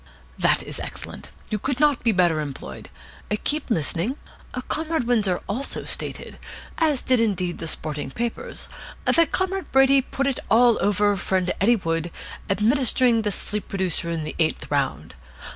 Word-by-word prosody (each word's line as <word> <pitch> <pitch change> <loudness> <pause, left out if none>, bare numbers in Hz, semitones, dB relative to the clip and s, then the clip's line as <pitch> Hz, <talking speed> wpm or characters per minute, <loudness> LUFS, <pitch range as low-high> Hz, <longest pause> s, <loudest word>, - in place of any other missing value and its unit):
"That - - +3
is - - -5
excellent. - - -7 0.2
You 210 - 0
could 265 +4 -2
not 295 -3 +3
be 230 - +4
better 175 -5 +3
employed. 135 - -6 0.5
Keep 300 -1 0
listening. 180 - 0 0.5
Comrade 320 -2 0
Windsor 210 -7 +2
also 245 +7 -2
stated - - -3 0.4
as 305 -5 +2
indeed 230 -5 +4
did 180 -1 -3
the 165 - -4
sporting 150 -3 -3
papers 235 - -4 0.4
that 335 -3 +4
Comrade 380 0 -1
Brady 270 0 +6
put 270 +1 -3
it 275 -2 0
all 235 +1 +5
over 205 0 +3
friend 185 -1 0
Eddie 235 +5 +5
Wood, 165 -4 -2 0.4
administering 235 +3 +3
the 210 -1 -1
sleep 210 +1 -2
producer 185 -3 -1
in 165 -2 -2
the 155 - -5
eighth 160 -2 0
round. 135 - -1
210 Hz, 150 wpm, -24 LUFS, 175-265 Hz, 0.5 s, Brady